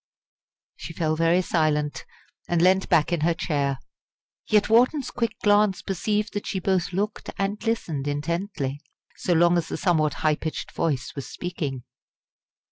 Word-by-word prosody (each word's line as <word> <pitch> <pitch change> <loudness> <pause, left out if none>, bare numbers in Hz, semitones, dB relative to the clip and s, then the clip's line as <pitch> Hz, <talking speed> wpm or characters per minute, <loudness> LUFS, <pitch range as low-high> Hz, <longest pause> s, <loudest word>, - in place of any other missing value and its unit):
She - - -8
fell 155 -1 0
very 165 +3 +3
silent, 150 -3 0 0.4
and 175 - +2
leant 185 +2 +3
back 170 0 +3
in 170 - 0
her 165 +2 +2
chair. 140 -5 -1 0.7
Yet 210 -2 +3
Wharton's 250 +5 +3
quick 230 -3 -2
glance 205 -2 +3
perceived 210 +3 -1
that 205 - -4
she 190 - -2
both 185 -1 0
looked 205 +4 -3
and 200 +2 -2
listened 170 -11 -2
intently, 145 -1 -2 0.4
so 180 - 0
long 175 +1 +4
as 165 - -4
the - - -4
somewhat 155 -6 +1
high 155 -1 +3
pitched 160 - -5
voice 145 -6 -2
was 140 - -6
speaking. 145 -8 -4
175 Hz, 150 wpm, -25 LUFS, 155-200 Hz, 0.7 s, long